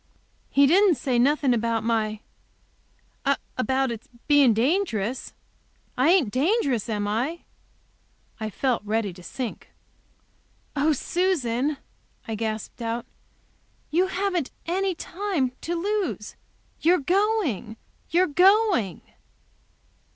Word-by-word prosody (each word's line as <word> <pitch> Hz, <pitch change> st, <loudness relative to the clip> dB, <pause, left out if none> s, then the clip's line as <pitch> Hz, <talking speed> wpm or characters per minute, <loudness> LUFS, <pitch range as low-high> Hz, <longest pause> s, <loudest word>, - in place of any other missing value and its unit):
"He 280 Hz, -, +5 dB
didn't 365 Hz, +4 st, +5 dB
say 250 Hz, -1 st, 0 dB
nothing 275 Hz, 0 st, +3 dB
about 230 Hz, -1 st, 0 dB
my 220 Hz, -2 st, 0 dB, 1.3 s
about 265 Hz, 0 st, 0 dB
it 225 Hz, -2 st, -5 dB, 0.3 s
being 290 Hz, -4 st, +6 dB
dangerous? 245 Hz, -, 0 dB, 0.6 s
I 260 Hz, +5 st, +3 dB
ain't 340 Hz, -, +4 dB
dangerous, 275 Hz, -, +1 dB
am 205 Hz, -2 st, -1 dB
I?" 250 Hz, +11 st, -1 dB, 1.0 s
I 220 Hz, -1 st, -3 dB
felt 250 Hz, +3 st, 0 dB
ready 210 Hz, -2 st, -1 dB
to 180 Hz, -, -13 dB
sink. 240 Hz, +6 st, -6 dB, 1.1 s
"Oh 295 Hz, +2 st, +3 dB
Susan!" 295 Hz, -4 st, 0 dB, 0.5 s
I 225 Hz, -, -3 dB
gasped 220 Hz, +2 st, -4 dB
out; 230 Hz, +1 st, -3 dB, 0.9 s
"you 355 Hz, +4 st, +3 dB
haven't 370 Hz, -5 st, -1 dB, 0.2 s
any 375 Hz, +2 st, 0 dB
time 345 Hz, -8 st, -2 dB
to 345 Hz, -, -2 dB
lose. 405 Hz, +3 st, -2 dB, 0.4 s
You're 350 Hz, +3 st, +4 dB
going, 355 Hz, -, 0 dB, 0.3 s
you're 355 Hz, +3 st, +4 dB
going!" 370 Hz, -, +3 dB
270 Hz, 105 wpm, -25 LUFS, 230-355 Hz, 1.3 s, being